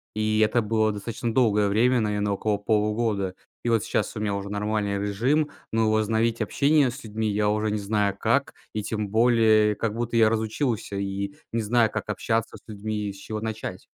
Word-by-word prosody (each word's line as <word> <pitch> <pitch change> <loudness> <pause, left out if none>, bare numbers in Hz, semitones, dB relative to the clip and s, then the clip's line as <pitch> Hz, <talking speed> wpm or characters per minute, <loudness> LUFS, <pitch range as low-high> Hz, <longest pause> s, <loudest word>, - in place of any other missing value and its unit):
И 110 0 +1
это 110 +2 +3
было 110 0 +1
достаточно 115 +3 -4
долгое 105 -5 +3
время, 120 +5 +3
наверно, 105 -1 0
около 105 +1 0
полугода. 105 -2 0 0.3
И - - +1
вот 115 -2 +2
сейчас - - -1
у - - -4
меня 100 -2 0
уже 100 0 -5
нормальный 105 -1 -1
режим. 125 +10 +1 0.2
Но 110 -1 +2
возобновить 110 +1 +1
общение 140 +5 +3
с 130 +1 -10
людьми 110 0 -2
я 105 0 +1
уже 105 0 0
не 105 - -1
знаю 100 -1 0
как. - - +1 0.2
И 105 - -2
тем 105 -2 -3
более, 110 -2 +4
как 110 -1 -2
будто 120 0 -3
я 110 -1 +5
разучился 110 -1 -1
и 100 0 -3 0.2
не 115 0 0
знаю, 115 +1 +2
как - - -4
общаться 115 0 -1
с - - -21
людьми 105 0 -4
и - - -6
с - - -13
чего 110 +2 -6
начать. 110 -1 -5
110 Hz, 195 wpm, -25 LUFS, 105-115 Hz, 0.3 s, я